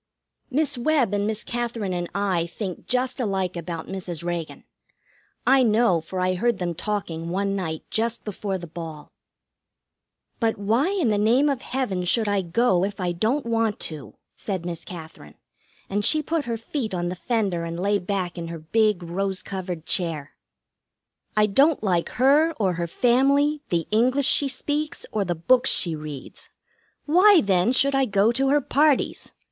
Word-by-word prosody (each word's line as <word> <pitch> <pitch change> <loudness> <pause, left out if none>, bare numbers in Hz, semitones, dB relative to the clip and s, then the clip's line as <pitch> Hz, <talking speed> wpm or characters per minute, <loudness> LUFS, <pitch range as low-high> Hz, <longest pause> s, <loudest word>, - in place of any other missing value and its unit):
Miss 280 -2 0
Webb 255 -5 +2
and 205 0 0
Miss 220 -1 -2
Katherine 235 -5 -3
and 175 -1 -3
I 190 -4 0
think 185 +1 -6
just 255 +1 -1
alike 195 -6 -1
about 170 -1 -5
Mrs. 180 -4 -5
Reagan. 170 -2 -4 0.8
I 270 0 +5
know, 220 -7 +3
for 185 +3 -6
I 185 0 +1
heard 235 +4 +1
them 175 -2 -2
talking 170 -4 -3
one 195 +2 -1
night 160 -5 -3
just 230 +1 -1
before 200 -2 -3
the 175 - -8
ball. 160 -2 -8 1.3
"But 225 -2 +1
why 225 - +1
in 375 - +1
the 210 -1 +1
name 245 +8 +3
of 265 -2 -3
Heaven 225 -9 -2
should 220 +4 +2
I 205 -1 +1
go 185 +1 +2
if 200 +1 -3
I 180 -1 0
don't 225 +11 0
want 225 -2 0
to?" 155 -4 -6 0.2
said 190 -4 -4
Miss 170 -2 -5
Katherine, 160 - -10 0.5
and 205 +1 -1
she 310 +7 +3
put 315 0 -1
her 230 -1 -2
feet 225 -2 -4
on 175 0 -1
the 180 - -4
fender 195 -5 -1
and 170 0 -5
lay 200 +2 +1
back 180 -2 -3
in 165 - -5
her 165 0 -6
big 205 +4 +1
rose 190 +2 -2
covered 180 -4 -5
chair. 160 -5 -1 1.1
"I 210 - +5
don't 275 +7 +3
like 180 -4 +1
her, 290 +6 +4
or 195 - 0
her 170 0 -3
family, 275 - +2
the 170 -2 0
English 255 +5 +2
she 285 - +4
speaks, 295 +4 -2
or 215 -2 0
the 175 -2 -2
books 250 +11 +3
she 170 -3 +3
reads. 150 -3 -8 0.6
Why, 365 +4 +6
then, 190 +2 +2
should 275 +2 +2
I 270 0 +3
go 205 0 +3
to 270 +3 +1
her 290 +1 +3
parties? 290 +1 +1
205 Hz, 175 wpm, -24 LUFS, 175-250 Hz, 1.3 s, Why